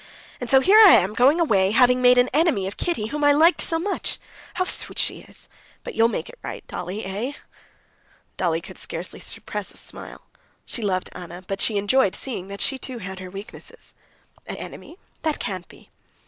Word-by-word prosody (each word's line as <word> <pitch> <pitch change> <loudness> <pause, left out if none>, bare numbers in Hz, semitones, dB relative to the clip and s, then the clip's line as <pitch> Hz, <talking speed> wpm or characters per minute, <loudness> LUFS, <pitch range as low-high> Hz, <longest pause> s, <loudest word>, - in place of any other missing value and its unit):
"And 245 - -5
so 265 +2 +6
here 400 +9 +6
I 420 -4 +10
am 195 0 +2
going 265 +8 +4
away, 195 - +3
having 250 +3 +4
made 250 0 +6
an 245 0 +5
enemy 295 - +2
of 195 - -5
Kitty, 275 -12 -2
whom 295 +2 -3
I 290 0 +6
liked 325 +4 +4
so 330 - +1
much! 385 +4 -2
Ah, - - -25 0.2
how 370 - +1
sweet - - -2
she - - -1
is! - - -12 0.4
But - - -7
you'll 225 0 +4
make 235 - -3
it - - -13
right, - - -7
Dolly? 195 +4 -6
Eh?" 210 +9 -4 1.0
Dolly 165 -2 0
could 185 0 -10
scarcely 170 +2 -4
suppress 210 -2 -5
a - - -10
smile. - - -7 0.4
She 240 - -3
loved 185 -3 -1
Anna, 175 +1 -9
but 195 0 -3
she 215 - +2
enjoyed 205 +1 +2
seeing 225 -8 -3
that 200 0 -6
she 270 -1 +1
too 255 -1 -6
had 190 -3 -7
her 185 -1 -8
weaknesses. 210 - -11 0.5
"An - - -5
enemy? 345 - -10 0.2
That 310 -2 -1
can't 185 -2 -5
be." - - -18
230 Hz, 200 wpm, -23 LUFS, 190-290 Hz, 1.0 s, I